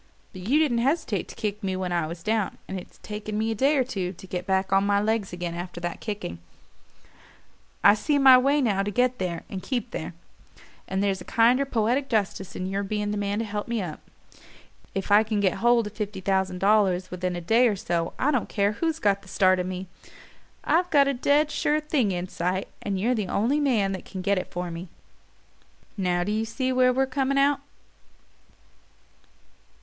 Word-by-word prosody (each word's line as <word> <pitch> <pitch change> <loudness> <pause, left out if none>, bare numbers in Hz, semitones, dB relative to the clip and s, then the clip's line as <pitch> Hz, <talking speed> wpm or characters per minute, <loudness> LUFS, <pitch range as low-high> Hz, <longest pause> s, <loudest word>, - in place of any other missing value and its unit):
But 185 - -9
you 275 +6 +4
didn't 290 -7 +2
hesitate 255 - 0
to - - -11
kick 210 -2 -3
me 190 -1 -1
when 185 -1 -3
I 170 -3 0
was 170 +1 -8
down 215 -1 -1
and 190 - -4
it's - - -14
taken 210 0 -5
me 220 +1 0
a - - +1
day 275 +7 +2
or 260 - +3
two 195 -7 -3
to 185 - -13
get 180 0 -5
on 190 +1 +2
my 200 0 +2
legs 215 -1 0
again 175 -1 -4
after 175 0 -6
that 175 0 -4
kicking. 205 - -5 1.4
I 200 - +8
see 285 +7 0
my 270 -2 +8
way 275 +3 +3
now 205 -6 +1
to 200 - -2
get 250 +4 +1
there 180 -3 -3
and 190 - -6
keep 245 -1 -3
there; 160 +1 -5 0.7
and 190 +1 -1
there's 195 -2 0
a - - -6
kinder 240 +7 +3
poetic 250 +2 0
justice 200 -4 -1
in 185 - -3
your 195 +1 -2
being 205 +1 -2
the - - -2
man 205 0 -1
to 225 - -1
help 210 -1 -4
me 235 -1 -1
up. 175 -6 -5 1.0
If 195 +1 -3
I 205 +1 +7
can 215 -1 -1
get 190 -3 +1
hold 240 -1 +4
of 210 - -7
fifty 210 -2 -4
thousand 190 -1 0
dollars 190 -2 +2
within 180 0 -2
a - - -3
day 230 +8 +4
or 215 - +1
so 170 -3 -2
I 290 - +2
don't 255 -6 -1
care 200 0 +1
who's 320 +8 -1
got 200 -7 +1
the 195 - -18
start 185 0 +3
of 180 - -2
me. 185 0 -4 0.8
I've 355 +2 +2
got 285 -4 +5
a - - +1
dead 290 +4 +2
sure 300 +1 +1
thing 295 -8 0
in 180 0 -3
sight, 185 +2 -2
and 195 -2 -2
you're 235 +6 +2
the 210 -5 -2
only 240 +11 +1
man 230 -9 +2
that 190 - -5
can 185 -2 -7
get 200 0 +2
it 185 - -7
for 175 0 -4
me. 170 +2 -7 1.1
Now 180 -3 0
do 205 - -2
you 220 +1 0
see 260 +3 -2
where 255 0 +4
we're 265 +2 +2
coming 270 +1 -1
out?" 280 +1 +3
205 Hz, 210 wpm, -25 LUFS, 185-245 Hz, 1.4 s, I